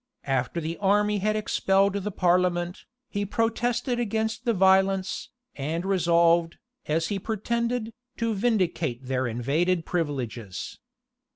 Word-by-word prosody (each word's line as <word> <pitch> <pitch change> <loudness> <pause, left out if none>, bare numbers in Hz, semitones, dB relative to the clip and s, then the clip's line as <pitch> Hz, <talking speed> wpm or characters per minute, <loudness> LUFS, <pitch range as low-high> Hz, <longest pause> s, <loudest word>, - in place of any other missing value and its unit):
After 135 +3 0
the 165 +1 -4
army 205 +1 +2
had 215 +2 +1
expelled 195 -2 +2
the 200 0 -2
parliament, 180 -1 +1 0.2
he 205 -1 -2
protested 235 +3 0
against 220 +1 -1
the 235 - +3
violence, 190 0 +2 0.3
and 160 +5 -3
resolved, 170 -3 +3 0.3
as 165 +2 0
he 200 - -1
pretended, 230 +2 -2 0.2
to 230 -1 0
vindicate 180 - 0
their 130 -1 0
invaded 155 +9 0
privileges. 125 - -4
190 Hz, 115 wpm, -26 LUFS, 165-215 Hz, 0.3 s, the